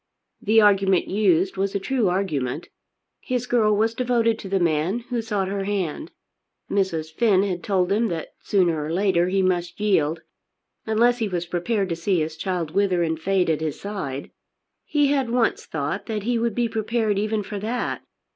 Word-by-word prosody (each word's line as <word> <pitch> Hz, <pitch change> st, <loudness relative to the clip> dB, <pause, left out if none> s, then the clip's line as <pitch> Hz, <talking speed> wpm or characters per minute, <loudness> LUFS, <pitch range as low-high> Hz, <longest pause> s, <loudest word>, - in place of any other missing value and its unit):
The 225 Hz, -1 st, +4 dB
argument 195 Hz, -3 st, +4 dB
used 190 Hz, -2 st, +2 dB
was 195 Hz, +1 st, -1 dB
a -, -, +1 dB
true 230 Hz, 0 st, 0 dB
argument. 155 Hz, -7 st, -2 dB, 0.5 s
His 250 Hz, -2 st, -2 dB
girl 220 Hz, -4 st, +3 dB
was 225 Hz, +2 st, +2 dB
devoted 230 Hz, -2 st, +1 dB
to 195 Hz, -, -7 dB
the 195 Hz, 0 st, +1 dB
man 170 Hz, +6 st, +1 dB
who 240 Hz, -2 st, 0 dB
sought 205 Hz, -4 st, -1 dB
her 195 Hz, 0 st, -2 dB
hand. 200 Hz, -, -2 dB, 0.6 s
Mrs. 165 Hz, -5 st, -1 dB
Finn 200 Hz, 0 st, +3 dB
had 185 Hz, -3 st, -2 dB
told 190 Hz, -2 st, +1 dB
him 220 Hz, +3 st, +2 dB
that 165 Hz, -4 st, -4 dB
sooner 170 Hz, -6 st, +1 dB
or 155 Hz, -, -4 dB
later 180 Hz, -1 st, +2 dB
he 190 Hz, +1 st, +1 dB
must 175 Hz, -1 st, -1 dB
yield, 165 Hz, -6 st, +1 dB, 0.6 s
unless 240 Hz, +3 st, +3 dB
he 225 Hz, -, 0 dB
was 175 Hz, -3 st, -2 dB
prepared 190 Hz, +4 st, -1 dB
to 170 Hz, -, -1 dB
see 175 Hz, +2 st, 0 dB
his 155 Hz, 0 st, -2 dB
child 170 Hz, -1 st, -3 dB
wither 185 Hz, -1 st, +2 dB
and 160 Hz, -1 st, -1 dB
fade 190 Hz, +2 st, +1 dB
at 160 Hz, -1 st, 0 dB
his 155 Hz, -2 st, -3 dB
side. 145 Hz, -10 st, -5 dB, 0.5 s
He 290 Hz, -2 st, +2 dB
had 270 Hz, -4 st, +1 dB
once 250 Hz, -, +1 dB
thought -, -, -3 dB
that 215 Hz, -3 st, -3 dB
he 240 Hz, +1 st, 0 dB
would 230 Hz, -2 st, -1 dB
be 240 Hz, -1 st, +1 dB
prepared 220 Hz, -2 st, 0 dB
even 215 Hz, 0 st, -1 dB
for 205 Hz, +1 st, -5 dB
that. 230 Hz, +5 st, -2 dB
195 Hz, 185 wpm, -23 LUFS, 175-220 Hz, 0.6 s, The